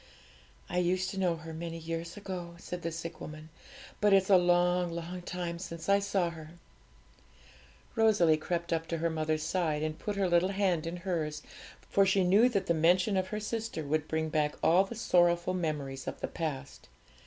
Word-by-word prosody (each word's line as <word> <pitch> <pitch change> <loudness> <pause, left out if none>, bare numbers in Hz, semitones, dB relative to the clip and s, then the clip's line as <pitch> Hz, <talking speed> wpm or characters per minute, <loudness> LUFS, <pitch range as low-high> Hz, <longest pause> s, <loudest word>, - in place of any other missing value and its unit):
'I 180 - -1
used 185 +1 0
to 195 - -5
know 180 -3 +2
her 160 0 -9
many 165 +1 -5
years 165 +2 -5
ago,' 180 -4 -6
said 175 +1 -6
the 165 - -3
sick 165 +1 -7
woman; 155 0 -8 0.5
'but 210 -2 +4
it's 195 0 +4
a - - +9
long, 175 0 +3
long 170 +2 -5
time 175 -1 -4
since 170 -2 -7
I 200 0 +5
saw 195 -3 0
her.' 160 -2 -10 1.5
Rosalie 210 -8 +4
crept 170 +2 -2
up 165 0 -1
to 165 - -2
her 165 +1 0
mother's 155 -1 -1
side, 160 -3 0
and 155 0 -3
put 210 - -3
her 195 -1 +1
little 175 +1 +3
hand 185 -5 +1
in 170 +2 -4
hers; 160 -4 -3 0.4
for 200 - +4
she 195 0 +3
knew 200 +7 +5
that 200 -6 0
the 170 - +2
mention 180 +5 +3
of 185 0 0
her 210 +2 -3
sister 220 -5 -3
would 155 +1 -1
bring 160 0 -1
back 150 -1 0
all 180 +4 +5
the 235 - -8
sorrowful 175 -4 +2
memories 145 -7 -3
of - - -5
the - - -2
past. 145 -5 -5
175 Hz, 190 wpm, -31 LUFS, 160-185 Hz, 1.5 s, a